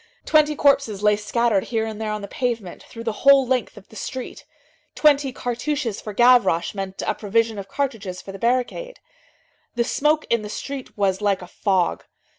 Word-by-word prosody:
Twenty 305 -1 +3
corpses 275 -8 +2
lay 210 0 +5
scattered 210 0 0
here 225 -2 -1
and 220 -1 -6
there 215 - -2
on 210 -1 -4
the - - -5
pavement, 230 -6 -3
through 230 - -10
the 230 - -1
whole 275 -1 +6
length 250 -3 -1
of 205 - -13
the - - -15
street. 255 +3 -6 0.5
Twenty 285 -3 +3
cartouches 245 -1 -3
for 210 - -6
Gavroche 240 -7 +4
meant 195 -1 -5
a - - +1
provision 220 +1 0
of 195 - -7
cartridges 215 -9 -3
for 195 - -9
the 195 - -9
barricade. 255 - -1 0.8
The 235 - +2
smoke 300 +5 +1
in 235 -1 +3
the 210 - -7
street 275 +3 -7
was 195 -1 +1
like 200 -3 +1
a - - -10
fog. 185 -1 0
230 Hz, 185 wpm, -22 LUFS, 200-260 Hz, 0.8 s, whole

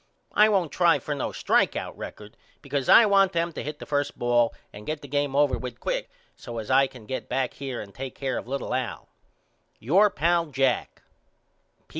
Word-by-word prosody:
I 215 +1 +6
won't 190 -7 +1
try 170 -2 +4
for 150 - -4
no 140 - -3
strike - - +1
out - - -5
record 105 +1 -9 0.3
because 140 -1 -2
I 230 - +9
want 195 -2 +4
them 170 0 -1
to - - -5
hit 150 +1 -5
the - - -9
first 145 -1 -1
ball 120 -1 +2 0.2
and 105 +1 -11
get 155 -1 -3
the - - -8
game 145 0 -1
over 145 -1 +3
with 125 -2 -7
quick - - -2 0.3
so 120 - -8
as 110 +2 -4
I 135 +1 +5
can 125 -4 -14
get 130 - -5
back 130 0 -1
here 135 -3 -5
and 100 -1 -11
take 135 0 -7
care 135 -2 -2
of - - -11
little 135 +1 -3
Al. - - -3 0.7
Your 190 - +4
pal, 170 0 +1
JACK. 135 -3 -1
140 Hz, 200 wpm, -26 LUFS, 125-165 Hz, 0.7 s, I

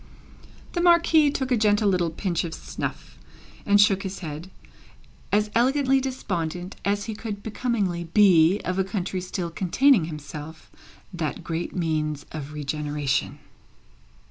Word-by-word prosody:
The 345 - 0
Marquis 335 -3 +5
took 265 -2 -3
a - - +5
gentle 210 -1 +3
little 180 -3 +2
pinch 170 0 -2
of 165 -2 -5
snuff, - - -6 0.5
and 205 0 +5
shook 200 -1 +5
his 195 0 -5
head; 155 +4 -6 0.8
as 210 +1 +2
elegantly 265 +2 +3
despondent 180 -9 -3
as 205 +1 0
he 225 - -4
could 210 -1 -6
becomingly 205 -6 -1
be 180 0 +5
of 185 +1 -1
a - - +3
country 190 -1 -3
still 180 -1 -4
containing 210 - +3
himself, 155 0 -9 0.4
that 160 -4 -3
great 165 +1 -4
means 155 -4 -1
of 150 -2 -6
regeneration. 145 -1 -2
185 Hz, 135 wpm, -25 LUFS, 160-215 Hz, 0.8 s, Marquis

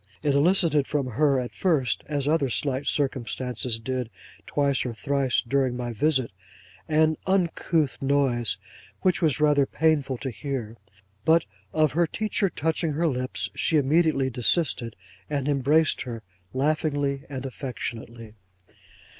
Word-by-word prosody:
It 145 -2 +2
elicited 155 -1 +3
from 145 -3 -1
her 140 +2 +2
at 125 -1 -5
first, 150 - +1
as 145 -2 -2
other 150 -3 +2
slight 135 +2 -1
circumstances 125 -3 -1
did 125 0 -3 0.4
twice 140 -2 +1
or 120 -3 -4
thrice 140 +1 +1
during 130 -1 +1
my 120 -1 -4
visit, 130 0 +1 0.6
an 155 0 +3
uncouth 170 -5 +1
noise 135 -6 +1 0.4
which 185 -2 +2
was 155 -3 +2
rather 145 -2 +3
painful 145 -4 +1
to 130 +1 -4
hear. 120 -1 -5 0.5
But 160 +4 +4 0.3
of 155 -2 +2
her 170 +4 +2
teacher 210 +1 -1
touching 160 0 -1
her 165 +4 0
lips, 130 -4 -1
she 160 - +1
immediately 145 -2 +2
desisted, 125 -1 +2 0.3
and 140 -2 -2
embraced 145 +3 +2
her 115 -3 -6 0.3
laughingly 145 0 0
and 135 -1 -5
affectionately. 120 -4 -6
140 Hz, 130 wpm, -25 LUFS, 130-155 Hz, 0.6 s, But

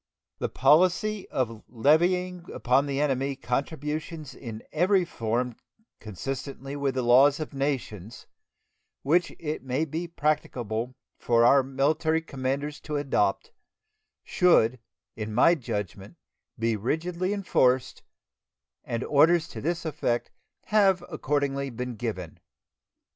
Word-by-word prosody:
The - - -1
policy 185 +6 +3
of 115 -4 -2
levying 175 +8 +2
upon 135 +3 +1
the 140 -1 -2
enemy 135 -1 0
contributions 150 +3 -4
in 115 -3 -8
every 185 +3 +3
form 120 -4 -2 0.4
consistently 135 +6 -6
with 140 -2 -1
the 130 - 0
laws 135 +5 +5
of 155 -1 -5
nations, 130 -7 -4 0.8
which 170 +5 +2
it 155 -1 -4
may 135 +4 -1
be 160 +3 -4
practicable 130 -7 -2 0.2
for 115 -1 +3
our 135 +3 +6
military 145 +4 +1
commanders 140 +1 -3
to 150 - -5
adopt, 145 - 0 0.7
should, 130 -9 +3 0.4
in 110 -1 -5
my 165 +8 +6
judgment, 105 - -5 0.4
be 115 -1 0
rigidly 170 - -2
enforced, 130 -11 +1 0.8
and 115 +1 -3
orders 160 +3 +4
to - - -7
this 170 +2 -2
effect 140 -6 -1 0.3
have 195 -4 +3
accordingly 140 -3 -1
been 125 +1 -5
given. 105 -8 -5
140 Hz, 115 wpm, -27 LUFS, 125-160 Hz, 0.8 s, our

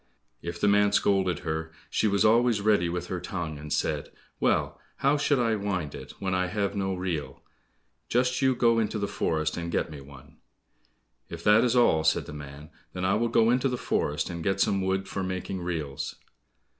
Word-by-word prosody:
If 85 0 -5
the - - +2
man 105 0 +4
scolded 95 -3 +2
her, 80 0 -3 0.2
she 110 - +1
was 100 0 +2
always 115 0 +4
ready 100 -4 +2
with 90 +1 -3
her 90 - -4
tongue, 85 -5 -5
and 75 0 -9
said, - - -1 0.3
"Well, - - +1 0.2
how 140 +2 +3
should 145 -1 +2
I 115 -3 +2
wind 95 -7 -2
it, - - -9
when 95 -1 -2
I 90 0 +1
have 100 +1 -2
no 95 -1 -1
reel? 90 -5 -4 0.7
Just 125 +2 +1
you 130 -1 +3
go 115 -1 +3
into 110 0 -1
the 100 -1 -1
forest 80 -4 -1
and 85 0 -4
get - - -1
me 75 -2 -8
one." 70 +2 -15 0.9
"If 85 0 -8
that 105 +2 +6
is 125 0 +2
all," 100 -10 +4
said 80 - +2
the - - -9
man, 75 +1 -10 0.2
"then 90 0 -3
I 95 - +3
will 115 +3 +1
go 115 0 +4
into 125 +2 +2
the 125 - -2
forest, 75 -7 -1
and 85 -1 -5
get 95 +1 0
some 100 0 +2
wood 95 +1 -1
for 95 - -4
making 95 0 -3
reels." 80 -6 -4
95 Hz, 200 wpm, -27 LUFS, 80-110 Hz, 0.9 s, that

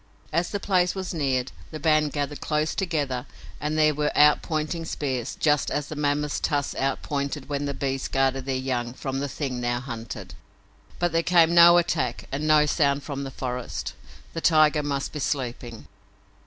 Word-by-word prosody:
As 170 +2 +1
the 205 - -3
place 180 -2 +1
was 190 -1 -4
neared 135 -5 0 0.2
the 155 - -7
band 155 0 +2
gathered 145 0 -3
close 155 0 0
together 145 -10 -2 0.3
and 150 +1 -2
there 155 -1 +4
were 150 0 0
outpointing 155 +2 +3
spears, 130 -6 -3
just 150 -2 +2
as 145 0 -2
the 155 - -5
mammoths' 150 0 0
tusks 145 -1 -1
outpointed 140 +1 -2
when 145 0 -2
the 140 -1 -3
beasts 135 -1 -2
guarded 135 -1 0
their 135 - 0
young 125 -2 -2
from 135 0 -3
the 140 0 -2
thing 130 -3 -3
now 120 0 0
hunted. 120 -3 -7 0.6
But 175 0 0
there 165 +1 +2
came 170 -1 +4
no 170 0 +8
attack 170 -8 0
and 145 +3 -2
no 155 -1 +5
sound 145 -2 +1
from 140 -2 -4
the - - -5
forest. 125 -2 -4 0.4
The 165 - -4
tiger 155 -2 +4
must 140 -2 -2
be 150 - -4
sleeping. 125 -5 -3
145 Hz, 175 wpm, -25 LUFS, 135-155 Hz, 0.6 s, no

